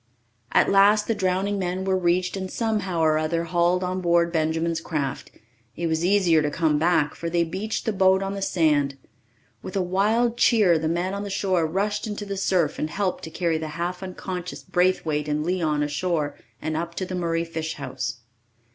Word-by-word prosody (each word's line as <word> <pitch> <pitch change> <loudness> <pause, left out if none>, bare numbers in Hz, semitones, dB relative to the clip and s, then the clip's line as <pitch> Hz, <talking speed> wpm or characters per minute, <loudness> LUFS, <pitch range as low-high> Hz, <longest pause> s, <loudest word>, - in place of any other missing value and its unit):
At - - +4
last 205 +2 +5
the 225 - +1
drowning 195 +1 0
men 185 0 -2
were 190 -1 +2
reached 180 0 +1
and 190 -1 -4
somehow 205 -7 -1
or 155 -1 +3
other 165 +2 -1
hauled 175 +1 +1
on 185 +1 -2
board 170 -1 +3
Benjamin's 160 +1 0
craft. 140 -5 -3 0.5
It 170 - -3
was 160 0 0
easier 180 -4 +4
to 150 - 0
come 155 -1 +1
back, 160 -2 +2
for 170 - -5
they 170 0 +2
beached 195 +7 -4
the 220 - 0
boat 190 0 +3
on 195 0 -3
the 200 - -5
sand. 150 -7 +1 0.6
With 185 - -8
a 195 - +2
wild 220 +6 +1
cheer 205 -10 +4
the 160 - -1
men 175 +3 -1
on 200 - -3
the 205 - -5
shore 190 -4 +1
rushed 205 +6 -1
into 205 0 -5
the 200 0 -4
surf 185 -5 +1
and 155 - -1
helped 190 +3 -2
to - - -7
carry 165 -1 -1
the 160 - -4
half 175 +2 -3
unconscious 180 -1 -6
Braithwaite 170 -5 +1
and 150 +1 -1
Leon 160 -5 0
ashore 150 0 -1 0.2
and 155 0 -3
up 170 +1 -3
to 190 - -2
the 185 - -7
Murray 170 -2 -1
fish 160 -1 -4
house. 130 -2 -5
175 Hz, 195 wpm, -24 LUFS, 160-190 Hz, 0.6 s, last